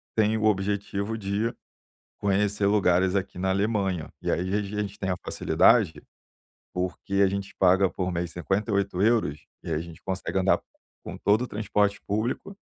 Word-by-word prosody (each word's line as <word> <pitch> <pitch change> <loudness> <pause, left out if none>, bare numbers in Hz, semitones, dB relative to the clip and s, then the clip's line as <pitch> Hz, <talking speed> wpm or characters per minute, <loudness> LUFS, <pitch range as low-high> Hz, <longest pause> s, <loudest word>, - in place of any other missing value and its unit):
tem 110 0 +3
o 110 - 0
objetivo 100 +1 0
de 105 +3 -1 0.7
conhecer 100 0 +1
lugares 95 -2 +3
aqui 95 -2 -2
na 95 +1 0
Alemanha. 95 -4 0
E - - -2
aí, - - +1
às 90 - -2
vezes, 100 +1 -1
a - - +2
gente 105 +1 -7
tem 95 -1 -2
a 90 - 0
facilidade, 80 -2 +3 0.7
porque 90 +2 -3
a 100 0 +5
gente 100 0 -4
paga 95 +1 +5
por 90 -1 -2
mês 85 -1 -2
58€, 100 -2 +1 0.2
e 85 - -5
a 75 - +1
gente 85 -1 -9
consegue 95 0 -2
andar 95 +1 +3 0.5
com - - -6
todo 105 +4 +2
o - - -3
transporte 105 -2 0
público, 115 - -2
100 Hz, 165 wpm, -26 LUFS, 95-105 Hz, 0.7 s, a